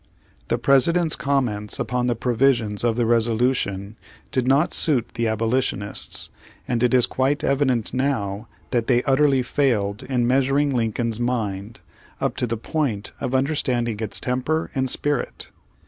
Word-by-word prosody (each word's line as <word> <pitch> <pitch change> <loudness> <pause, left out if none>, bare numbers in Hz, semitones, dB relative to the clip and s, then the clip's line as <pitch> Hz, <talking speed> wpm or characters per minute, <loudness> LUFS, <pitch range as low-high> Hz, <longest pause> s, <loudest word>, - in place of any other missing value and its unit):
The 120 - 0
President's 155 +6 +3
comments 125 -6 -1
upon 125 0 -1
the 120 - +1
provisions 120 -3 +1
of 115 -2 +2
the 120 -1 +1
resolution 115 -3 0 0.3
did 130 -1 0
not 140 +5 +3
suit 130 -7 +3
the 115 0 -1
abolitionists, 110 -1 -1 0.4
and 120 -2 -1
it 125 -1 +3
is 125 - +5
quite 140 +4 0
evident 130 -5 +1
now 115 -6 -1 0.2
that 120 -3 0
they 125 -2 +3
utterly 135 -1 +3
failed 110 -7 0
in 125 -2 -1
measuring 135 +3 +2
Lincoln's 115 -1 -1
mind, 110 -4 -3 0.4
up - - -1
to 125 - 0
the 115 0 -2
point 115 -5 -2
of 130 - -2
un 130 +1 +3
derstanding 120 -7 -1
its 105 -2 +3
temper 130 +6 -1
and 130 -1 -1
spirit. 145 +2 -1
125 Hz, 145 wpm, -22 LUFS, 115-135 Hz, 0.4 s, is